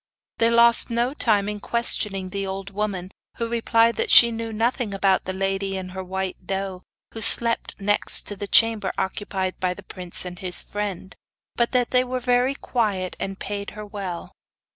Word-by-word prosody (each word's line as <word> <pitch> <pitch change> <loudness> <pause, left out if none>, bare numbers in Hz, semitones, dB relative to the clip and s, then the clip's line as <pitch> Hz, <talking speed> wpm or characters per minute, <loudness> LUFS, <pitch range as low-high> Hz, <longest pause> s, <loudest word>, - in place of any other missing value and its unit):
They 230 - +4
lost 235 +1 +6
no 240 +3 0
time 210 -8 +1
in 210 0 -4
questioning 200 -4 -1
the 195 0 -3
old 195 +1 -6
woman, 195 -3 -3 0.3
who 230 - -2
replied 230 0 +2
that - - -1
she 235 -1 +9
knew 225 0 -5
nothing 225 -1 -1
about 195 -1 +1
the 185 - -3
lady 195 0 -2
and 185 -1 -6
her 190 0 -6
white 190 0 -5
doe, 190 -1 -4 0.3
who 225 - -7
slept 230 +1 +4
next 205 0 +1
the 205 - -4
chamber 220 -3 +3
occupied 190 -1 -3
by 180 -1 -1
the 205 - -12
prince 180 -1 -2
and 180 -1 -8
his 180 -1 0
friend, 195 -3 -5 0.4
but 235 -1 +1
that 250 -1 +1
they 250 0 +4
were 255 0 -3
very 250 +2 +1
quiet, 205 -9 -2
and 195 0 -4
paid 200 0 -5
her 210 - -7
well. 195 -4 -6
205 Hz, 180 wpm, -23 LUFS, 190-230 Hz, 0.4 s, she